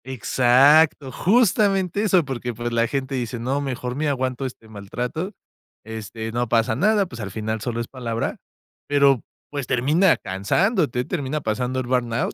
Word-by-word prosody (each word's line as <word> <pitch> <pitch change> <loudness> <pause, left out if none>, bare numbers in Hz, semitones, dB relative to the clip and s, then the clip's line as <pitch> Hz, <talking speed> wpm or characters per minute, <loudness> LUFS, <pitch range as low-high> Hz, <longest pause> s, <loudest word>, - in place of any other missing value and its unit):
Exacto, 130 +4 +4
justamente 200 - +2
eso, 190 -6 +3
porque, 125 -3 -4
pues, 120 +1 -4
la 115 0 +2
gente 135 +1 -3
dice: 125 -1 -3
"No, 130 +5 -1
mejor 125 -2 -4
me 155 +2 -1
aguanto 130 -1 -2
este 120 -3 -12
maltrato, 125 - -5 0.5
este, 110 0 -6
no 120 0 -1
pasa 115 0 +2
nada, 205 - +3
pues, 120 -9 -9
al 100 - -4
final 110 +2 -3
solo 120 0 -3
es 115 - -3
palabra", 115 -3 -3 0.5
pero, 140 -4 +4 0.3
pues, 140 -4 -4
termina 150 +9 +3
cansándote, 125 - 0
termina 145 +2 -3
pasando 125 +3 -1
el 130 - -3
burnout, 120 -2 0
130 Hz, 155 wpm, -22 LUFS, 115-145 Hz, 0.5 s, Exacto